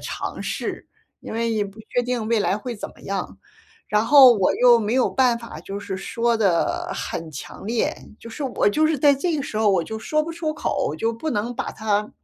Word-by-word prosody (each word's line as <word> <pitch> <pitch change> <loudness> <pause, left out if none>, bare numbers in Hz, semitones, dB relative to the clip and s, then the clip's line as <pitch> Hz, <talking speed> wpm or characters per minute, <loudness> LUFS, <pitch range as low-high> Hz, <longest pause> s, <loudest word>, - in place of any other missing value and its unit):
尝 - - -5
试。 - - -4 0.3
因 - - -8
为 230 +1 -1
也 215 -2 0
不 200 +2 -11
确 245 - 0
定 245 -2 -2
未 225 -1 +2
来 200 0 +1
会 240 +2 -5
怎 205 - -6
么 - - -20
样， 195 -2 -4 0.5
然 210 +1 +1
后 270 -1 +9
我 195 -5 +2
又 245 -1 +7
没 215 +2 -1
有 260 - +3
办 250 -3 +2
法， 230 0 -9
就 195 +1 -6
是 200 -2 -5
说 230 +4 0
得 195 -6 +1
很 165 -1 -5
强 145 +4 -9
烈。 225 +2 0 0.2
就 - - -11
是 230 +6 -7
我 255 -6 +1
就 310 +9 +2
是 315 -2 0
在 285 +1 +5
这 320 +4 -1
个 - - -2
时 245 -6 -5
候 215 -1 +3
我 180 -4 +1
就 220 - -5
说 305 +6 0
不 325 +2 -3
出 325 -2 -2
口， 230 - -2
就 225 +5 0
不 310 +8 -4
能 230 +1 -2
把 265 - -3
它 210 -1 -1
230 Hz, 245 characters per minute, -23 LUFS, 205-260 Hz, 0.5 s, 后